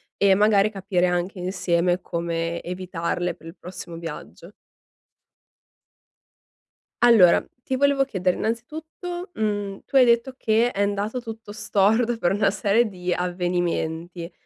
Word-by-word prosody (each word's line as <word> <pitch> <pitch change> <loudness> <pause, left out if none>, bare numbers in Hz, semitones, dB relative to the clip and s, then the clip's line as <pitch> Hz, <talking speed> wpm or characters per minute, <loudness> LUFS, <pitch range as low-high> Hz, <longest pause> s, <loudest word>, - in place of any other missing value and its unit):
e 195 -1 +4
magari 210 0 +4
capire 190 -3 0
anche 180 +2 -2
insieme 180 -1 0
come 170 0 -3
evitarle 175 -1 -3
per 165 - -15
il 165 - -10
prossimo 175 -2 -8
viaggio. 165 +2 -9 2.5
Allora, 220 -8 +6 0.2
ti 260 - -2
volevo 280 0 +3
chiedere, 185 -7 -1
innanzitutto, 320 - -5
mhmm, 205 -2 -2
tu 275 - -9
hai 255 -2 +8
detto 235 +2 +2
che 230 +2 +2
è 200 - -2
andato 205 +4 -1
tutto 225 -2 -9
storto 220 +3 +1
per 175 -5 +1
una 200 0 +2
serie 215 +3 +2
di 180 -3 -3
avvenimenti, 175 -1 -2
195 Hz, 125 wpm, -24 LUFS, 175-225 Hz, 2.5 s, hai